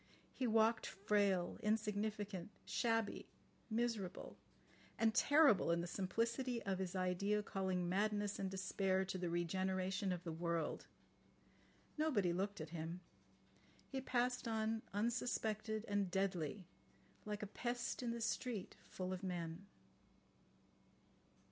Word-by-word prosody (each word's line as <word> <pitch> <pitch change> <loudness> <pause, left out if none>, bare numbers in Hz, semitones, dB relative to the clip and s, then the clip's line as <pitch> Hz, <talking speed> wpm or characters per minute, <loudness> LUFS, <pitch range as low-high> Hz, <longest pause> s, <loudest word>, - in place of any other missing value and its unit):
He 255 - 0
walked 225 0 +4
frail, 200 -2 +1
insignificant, 210 -2 -1 0.2
shabby, 225 -3 0 0.4
miserable—and 225 0 -2
terrible 285 - +6
in 170 0 +3
the - - -2
simplicity 230 +7 0
of 195 -1 -1
his 190 -1 -2
idea 190 +3 +1
calling 190 -3 -1
madness 205 +2 +1
and 195 - -1
despair 190 0 +1
to 190 0 -3
the 175 -1 -1
regeneration 185 +3 0
of 180 -1 -3
the 165 - -3
world. 170 0 -1 1.1
Nobody 210 - +3
looked 200 +3 -1
at 155 0 -5
him. 170 +2 -4 0.9
He 265 -1 -2
passed 250 -1 +1
on 220 0 0
unsuspected 220 0 0
and 205 -2 +1
deadly, 185 -1 -1 0.6
like 210 0 -3
a - - -1
pest 240 +4 -2
in 245 - -1
the 235 0 -2
street 230 -2 -2
full 185 0 -3
of 185 - -4
men. 175 0 -4
200 Hz, 115 wpm, -40 LUFS, 185-225 Hz, 1.1 s, terrible